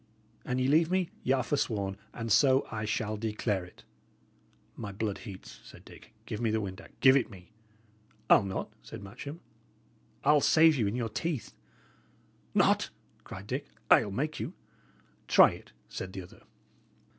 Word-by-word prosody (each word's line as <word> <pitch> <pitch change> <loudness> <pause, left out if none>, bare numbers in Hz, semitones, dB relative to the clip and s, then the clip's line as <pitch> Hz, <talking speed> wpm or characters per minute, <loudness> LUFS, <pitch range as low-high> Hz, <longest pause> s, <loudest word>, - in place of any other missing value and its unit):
"An 125 - -2
ye 130 0 +1
leave 160 +4 +4
me, 185 -2 0
y' - - +1
are 130 -2 +1
forsworn, 105 -9 -1 0.2
and 115 -1 -5
so 130 +5 +5
I 110 -2 -3
shall 110 0 -1
declare 105 -3 -1
it." 90 - -15 0.9
"My 105 -3 -6
blood 105 0 -3
heats," 100 -6 -10
said - - -14
Dick. - - -15
"Give 105 - -5
me 115 - +1
the 110 +1 +1
windac! 95 -2 -8
Give 130 0 +7
it 135 - +2
me!" 95 0 -14 0.8
"I'll - - +7
not," 100 +1 -4
said 110 -2 -10
Matcham. 140 - -8 0.8
"I'll 150 +1 +5
save 160 +1 +6
you 115 -6 +1
in 100 - -2
your 120 -2 -2
teeth." 150 +4 -3 1.0
"Not?" - - +3 0.3
cried 95 +1 -9
Dick. 130 +6 -4 0.2
"I'll 105 - +6
make 145 +10 -2
you!" - - -4 0.7
"Try - - +7
it," - - -12 0.2
said 95 0 -6
the 95 - -6
other. 90 - -16
115 Hz, 160 wpm, -30 LUFS, 100-135 Hz, 1.0 s, Give